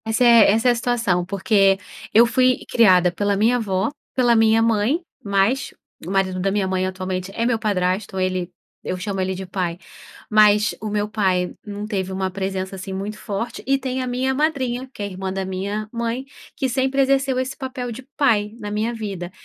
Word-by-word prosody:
Essa 225 +2 +1
é 235 -4 +7
essa 225 +4 +2
é - - +6
a - - +1
situação 230 -7 0
porque, 195 0 +3 0.4
eu 230 +2 +7
fui 255 +2 +3
criada 185 -6 +5
pela 200 +3 0
minha 230 +4 +3
avó, 195 -5 0 0.3
pela 245 -2 +4
minha 225 0 +4
mãe, 225 +6 +2 0.2
mas 200 +7 +1 0.3
o - - -6
marido 190 -1 0
da 195 +1 0
minha 200 -1 0
mãe 185 0 0
atualmente 185 0 -4
é 230 - 0
meu 235 -2 +1
padrasto, 190 -1 -1
ele, 185 -1 -1 0.3
eu 185 - -3
chamo 195 +1 -3
ele 190 0 -1
de 190 +1 -6
"pai", 180 -2 -3 0.5
mas 210 -1 +4
o 215 - -3
meu 210 0 -1
pai 190 -4 0
não 205 0 -6
teve 190 -3 -3
uma 190 0 -2
presença 190 0 -3
assim 190 0 -7
muito 200 +3 -4
forte, 230 +4 -4
e 275 0 +3
tem 260 -1 -3
a 255 - -3
minha 255 +2 0
madrinha 265 -4 -1
que 210 - -7
é - - -1
irmã 190 -1 -5
da 190 0 -3
minha 200 +3 -3
mãe, 235 +2 -2 0.3
que 270 - -1
sempre 265 +2 0
exerceu 270 -1 +2
esse 260 +1 -3
papel 255 -2 -5
de 235 +3 -7 0.2
"pai", 220 -6 +2
na 210 -2 -6
minha 220 +3 -1
vida. 195 -5 -5
210 Hz, 200 wpm, -21 LUFS, 190-240 Hz, 0.5 s, é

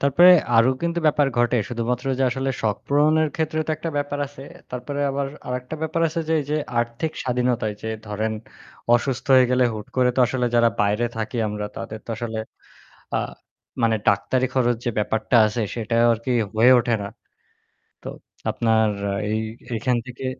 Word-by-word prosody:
তারপরে 155 +6 +6 0.3
আরো 115 +3 +6
কিন্তু 170 0 0
ব্যাপার 145 -1 +3
ঘটে। 120 +1 +3
শুধুমাত্র 120 +2 -2
যে - - +1
আসলে 135 +1 -1
শখ 105 -3 +1
পূরণের 155 +2 +3
ক্ষেত্রে 155 -1 -1
তো - - -2
একটা 165 +1 -4
ব্যাপার 145 0 -3
আছে। 135 -1 -12 0.3
তারপরে 130 +3 -4
আবার 140 0 -2 0.2
আরেকটা 125 +4 -4
ব্যাপার 160 +1 -1
আছে 165 +2 -3
যে 160 - +2
এইযে 150 +2 -2 0.2
আর্থিক 120 +7 -3
স্বাধীনতায় 125 -4 0
যে 110 - -4 0.2
ধরেন 110 +1 -2 0.6
অসুস্থ 125 +1 -1
হয়ে 130 - +7
গেলে 125 0 +4
হুট 105 -1 -7
করে 125 -1 +4
তো - - +3
আসলে 125 -1 -1
যারা 115 0 +5
বাইরে 105 +4 +1
থাকি 110 +2 -4
আমরা 105 0 -4
তাদের 110 - -6
তো - - -6
আসলে 115 -2 -4 0.8
আ - - +3 0.7
মানে 115 -1 +3
ডাক্তারি 115 +6 +2
খরচ 120 -2 +2
যে - - +2
ব্যাপারটা 110 +3 0
আছে 110 +2 -2
সেটা 115 0 -2 0.2
আরকি 115 +3 -4 0.2
হয়ে 120 +4 +6
ওঠে 120 0 0
না। 100 - -4 1.0
তো - - -8 0.4
আপনার 110 -1 +2 0.4
এই 110 - 0 0.3
এইখান 125 +2 0
থেকে 130 +1 -7
125 Hz, 170 wpm, -23 LUFS, 115-140 Hz, 1.0 s, হয়ে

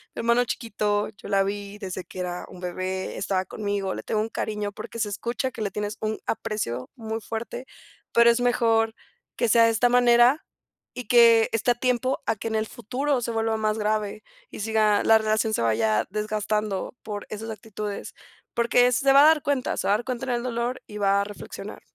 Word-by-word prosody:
"Hermano 235 +1 +2
chiquito, 210 -3 -1
yo - - -11
la 195 -1 +3
vi 200 +1 -5
desde 185 -2 -5
que 185 - -10
era 180 0 -4
un 180 - -12
bebé, 185 +1 -4
estaba 190 -1 0
conmigo, 200 -1 -3
le - - -6
tengo 215 -1 0
un 225 - -3
cariño", 210 -2 -3
porque 230 - -8
se 210 -2 0
escucha 240 +6 -3
que 225 - -8
le 205 - 0
tienes 210 0 -4
un 215 0 -1
aprecio 210 - -3
muy 225 -1 -4
fuerte, 230 +4 -5 0.5
pero 235 0 +6
es 235 - +3
mejor 225 -2 +2 0.4
que 235 - +1
sea 230 +1 +6
de 230 - +4
esta 235 +2 +3
manera 245 +3 +5 0.5
y 250 -3 -6
que 230 -2 +6
esté 225 +2 +2
a - - +1
tiempo 255 +1 0
a 225 - +2
que 225 - -5
en 220 - -2
el 220 0 0
futuro 260 +4 -2
se 235 - -2
vuelva 225 0 0
más 215 0 0
grave 210 0 -1 0.3
y - - -8
siga 215 -1 +2
la 225 0 +6
relación 220 0 0
se - - 0
vaya 110 -1 +2
desgastando 210 0 -2
por 205 -2 -5
esas 220 +1 -6
actitudes. 210 -1 -6 0.4
Porque 235 +1 +4
se 270 +2 +3
va 280 +1 +8
a - - +8
dar 315 -2 +5
cuenta, 280 -3 0
se - - -1
va 200 - +5
a - - +2
dar 240 - -7
cuenta 255 0 -3
en 250 - 0
el 240 0 -1
dolor 245 +1 -2
y 210 - -8
va 200 0 +3
a - - -2
reflexionar. 205 0 -9
220 Hz, 210 wpm, -25 LUFS, 205-235 Hz, 0.5 s, va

